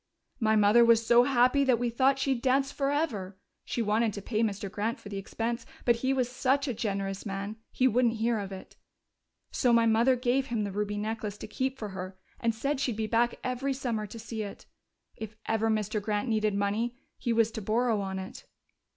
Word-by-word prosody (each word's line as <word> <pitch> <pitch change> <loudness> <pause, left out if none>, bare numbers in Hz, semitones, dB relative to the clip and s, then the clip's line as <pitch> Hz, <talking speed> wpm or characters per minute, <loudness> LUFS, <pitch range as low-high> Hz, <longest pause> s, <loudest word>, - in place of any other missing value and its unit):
"My 220 -2 +3
mother 210 +3 +6
was 230 -1 +5
so 240 +2 +6
happy 255 +1 +4
that 255 -3 +3
we 240 0 -1
thought 265 +3 +3
she'd 265 -3 0
dance 270 +2 +2
forever. 275 - -1 0.3
She 235 - -2
wanted 220 +1 +1
to 200 - -6
pay 220 0 -1
Mr. 205 -3 -1
Grant 215 +5 -2
for 205 - -10
the 200 - -5
expense, 230 +4 -3 0.2
but 240 -1 +4
he 260 +3 0
was 260 -2 +1
such 265 +3 0
a 255 - -1
generous 195 -3 -3
man 200 +1 -4
he 260 - +3
wouldn't 240 -1 +2
hear 225 0 0
of 200 -1 -5
it. 190 -1 -9 0.8
So 250 - +2
my 230 -1 +5
mother 230 +3 +4
gave 255 +2 0
him 230 -3 -1
the 200 - -3
ruby 205 +1 -2
necklace 215 -1 -3
to - - -8
keep 265 0 -2
for 215 - -5
her 185 0 -7 0.2
and 230 -1 0
said 275 +5 -1
she'd 250 -5 -1
be 220 - -1
back 235 +2 +1
every 255 +2 -1
summer 235 -5 -2
to 230 - -10
see 225 0 -5
it. 205 -2 -7 0.5
If 220 -1 -7
ever 225 0 +1
Mr. 215 -1 0
Grant 210 +3 -1
needed 215 -2 +1
money, 210 +4 0 0.2
he 240 - -1
was 230 -1 +3
to 220 - -5
borrow 220 +1 +1
on 190 -1 -3
it. 190 0 -8
225 Hz, 210 wpm, -29 LUFS, 210-250 Hz, 0.8 s, mother